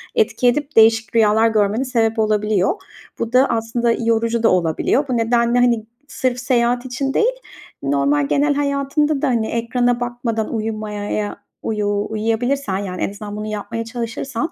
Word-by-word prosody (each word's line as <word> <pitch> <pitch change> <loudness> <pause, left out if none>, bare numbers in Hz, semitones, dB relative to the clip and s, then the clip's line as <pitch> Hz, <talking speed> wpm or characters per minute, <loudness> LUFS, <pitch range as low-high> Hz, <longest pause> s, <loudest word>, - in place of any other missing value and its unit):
etki 435 - +2
edip 290 +4 0
değişik 225 -1 +4
rüyalar 220 0 +4
görmene 215 +3 +1
sebep 225 -3 0
olabiliyor. 210 - +1 0.4
Bu 230 +1 -3
da 255 +2 +6
aslında 230 +1 0
yorucu 230 0 0
da 225 - +5
olabiliyor. 180 - +1
Bu 250 - +1
nedenle, 235 +1 +2
hani, 235 -3 +2 0.2
sırf 255 -3 -2
seyahat 245 0 +1
için 270 +2 -2
değil, - - +2 0.5
normal 140 +1 +1
genel 290 - +2
hayatında 280 +1 0
da, - - +1
hani, 230 -4 +1
ekrana 245 +1 0
bakmadan 240 -2 -3
uyumaya, 215 -2 -4
ya, 210 -1 -2 0.3
uyu 205 -1 -1
uyuyabilirsen, 225 +1 -1
yani, 185 -2 -5
en - - 0
azından, 205 0 -8
bunu 210 0 -5
yapmaya 220 +2 -4
çalışırsan 240 +5 -4
230 Hz, 155 wpm, -19 LUFS, 215-250 Hz, 0.5 s, da